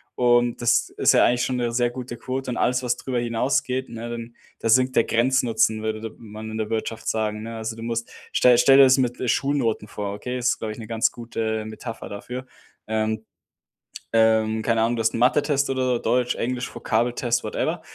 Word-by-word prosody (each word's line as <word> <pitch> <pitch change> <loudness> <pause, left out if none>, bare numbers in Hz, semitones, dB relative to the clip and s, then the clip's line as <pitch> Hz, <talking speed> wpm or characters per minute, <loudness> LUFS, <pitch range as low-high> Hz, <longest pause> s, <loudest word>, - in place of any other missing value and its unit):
Und 120 -1 +2
das 120 - +2
ist - - +3
ja - - +5
eigentlich 120 0 +2
schon 130 - -2
'ne 120 -1 -1
sehr 120 0 +1
gute 120 -1 -7
Quote 130 +1 -4
und - - -3
alles, 125 +1 +1
was 120 0 0
drüber 125 -2 -2
hinausgeht, 125 +2 0
ne, 115 0 -7
dann 115 0 -7 0.2
da - - -2
sinkt 130 +3 +3
der 115 - +5
Grenznutzen, 115 -2 +2
würde 110 0 -3
d 110 - -4
man 110 0 -9
in 110 - -5
der 110 -1 -3
Wirtschaft 110 0 -3
sagen, 105 -1 -1
ne? 115 0 -6
Also, 110 0 -4
du 115 - -7
musst 115 0 -3 0.2
stell 125 -1 +5
dir - - +2
stell 135 +2 +6
dir 140 - +9
das 130 0 +6
mit, 125 -2 0
äh, 125 - -1
Schulnoten 135 -7 0
vor, 100 -1 -5
okay? 125 +5 -4
Ist, 125 0 0
glaube 110 -1 -4
ich, - - -13
'ne 110 -2 -8
ganz 115 -1 +1
gute 110 -2 -3
Metapher 115 +1 -7
dafür. 125 +5 -7 0.4
Ähm. 110 0 -1 0.9
Ähm, 110 -1 +3
keine 115 -1 +1
Ahnung, 115 +2 +1
du 115 - -1
hast 110 - +1
'n - - -2
Mathetest 140 +3 +2
oder 130 -2 0
Deutsch, 125 0 +1
Englisch, 125 +1 -3
Vokabeltest, 120 +1 0
whatever. - - -2
120 Hz, 210 wpm, -23 LUFS, 110-125 Hz, 0.9 s, dir